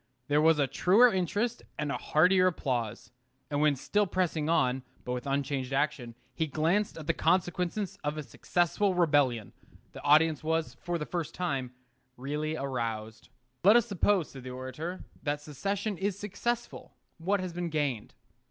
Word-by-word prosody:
There 145 +1 +4
was 160 0 +5
a 145 - +3
truer 210 - +5
interest 205 +6 -1 0.2
and 150 -1 -2
a - - -1
heartier 185 +4 +4
applause. 120 - -2 0.4
And 145 0 +1
when 150 -1 +4
still 205 +9 0
pressing 170 -4 0
on, 130 -5 +2 0.2
but 125 - -3
with 125 +2 -4
unchanged 140 -1 -1
action, 135 -5 -1 0.2
he 160 - -1
glanced 165 +8 0
at 160 - -7
the - - +2
consequences 180 +3 0
of 150 +1 -2
a 155 - -3
successful 175 - 0
rebellion, 145 - +2 0.4
the - - -10
audience 155 +1 +4
was, 160 0 0
for 175 0 -3
the 150 - -4
first 170 -2 -4
time, 135 -8 -2 0.4
really 150 +4 -2
aroused. 115 -5 -4 0.3
Let 205 +5 +7
us 240 -2 +5
suppose, 200 -4 +1
said 135 - -9
the 130 - -7
orator, 130 +8 -6 0.2
that 145 -1 -1
secession 195 - -3
is 195 0 -1
successful, 235 +4 -4 0.2
what 195 +5 +1
has 185 -2 -4
been 175 0 -3
gained? 145 -8 -2
155 Hz, 160 wpm, -30 LUFS, 140-185 Hz, 0.4 s, Let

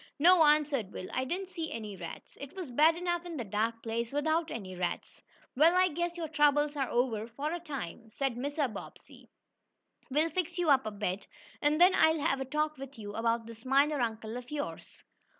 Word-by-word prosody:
"No," 345 +4 +6
answered 295 -8 +3
Will, 185 - -6
"I 260 - 0
didn't 370 +6 -4
see 330 -3 -4
any 215 -3 -5
rats. 170 -3 -9
It 280 +5 -8
was 360 -9 -6
bad 310 +6 +5
enough 345 0 -1
in 345 -3 -6
the 245 - -2
dark 225 +3 -1
place, 230 +1 -2
without 315 +3 +1
any 190 -5 -6
rats." 180 -1 -4 0.3
"Well, 320 +6 +5
I 370 0 +5
guess 345 +2 -2
your 330 -2 -3
troubles 295 -1 +3
are 270 -3 -1
over, 230 -3 0
for 280 +6 -4
a 345 - -3
time," 245 - -6
said 270 +3 -1
Mr. 285 +3 -1
Bobbsey. - - -11 0.8
"We'll 305 +5 +2
fix 355 +1 -2
you 345 -4 +3
up 260 -5 +4
a - - -2
bed, 200 -1 -3 0.3
and 295 +1 +2
then 360 +2 +7
I'll 320 -3 +4
have 280 -3 +1
a - - -2
talk 300 +1 -1
with 275 0 -9
you 205 -2 -7
about 230 +1 0
this 230 0 -11
miner 280 +2 +3
uncle 225 0 -2
of 250 0 -9
yours." 295 -1 -6
280 Hz, 205 wpm, -31 LUFS, 230-320 Hz, 0.8 s, then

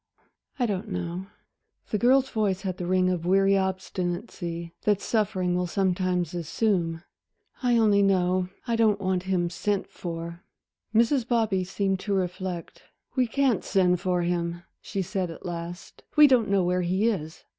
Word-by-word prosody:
"I 250 - +1
don't 210 0 -2
know." 180 0 -4 0.6
The 210 - +1
girl's 265 +4 +4
voice 200 -4 0
had 185 -2 -3
the 175 - -4
ring 185 0 +3
of 175 -2 -2
weary 195 +2 +4
obstinacy 175 -2 -3
that 210 -2 +2
suffering 190 -6 0
will 180 0 0
sometimes 180 -2 0
assume. 170 -1 -1 0.6
"I 245 -2 +3
only 210 -3 +4
know 185 -2 +2 0.2
I 235 - 0
don't 220 -3 +3
want 185 -2 0
him 175 -2 +1
sent 200 +2 -1
for." 170 0 -6 0.5
Mrs. 230 +3 +3
Bobby 220 -6 +1
seemed 195 +1 -1
to 200 0 -1
reflect. 180 -1 -3 0.3
"We 255 -2 +2
can't 260 -2 +1
send 180 -2 +2
for 180 -1 +1
him," 170 0 -2 0.2
she 195 -2 -3
said 185 0 -2
at 165 - -10
last, 175 0 -7
"we 300 - +9
don't 250 -7 +4
know 195 -2 +3
where 180 +1 +1
he 185 +5 +1
is." 160 -8 -3
185 Hz, 155 wpm, -26 LUFS, 175-210 Hz, 0.6 s, we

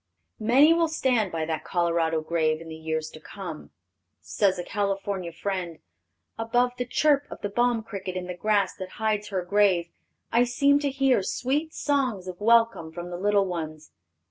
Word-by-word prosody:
Many 270 +8 +5
will 335 0 +2
stand 250 - +1
by 160 -1 -2
that 160 -1 -3
Colorado 170 -2 0
grave 155 -1 0
in 165 0 -10
the 160 - -7
years 160 0 -3
to 155 - -11
come. - - -8 0.5
Says 195 -3 +1
a 175 - -3
California 195 -2 -2
friend: 175 -1 -4 0.6
"Above 245 +2 +2
the 245 - -2
chirp 290 +1 +2
of - - -9
the 205 - -2
balm 240 +1 +1
cricket 195 -4 -6
in 180 - -4
the 180 - -5
grass 200 +1 +1
that 185 -1 -7
hides 215 -1 0
her 185 -3 -3
grave, 185 -3 +2 0.4
I 235 +1 +4
seem 280 +4 +3
to 290 -1 0
hear 270 -4 +2
sweet 285 +10 -2
songs 255 -10 0
of 185 +1 -7
welcome 230 -7 +3
from 175 +2 -7
the 175 - -4
little 205 0 +3
ones. 155 -4 -5
200 Hz, 175 wpm, -26 LUFS, 170-245 Hz, 0.6 s, Many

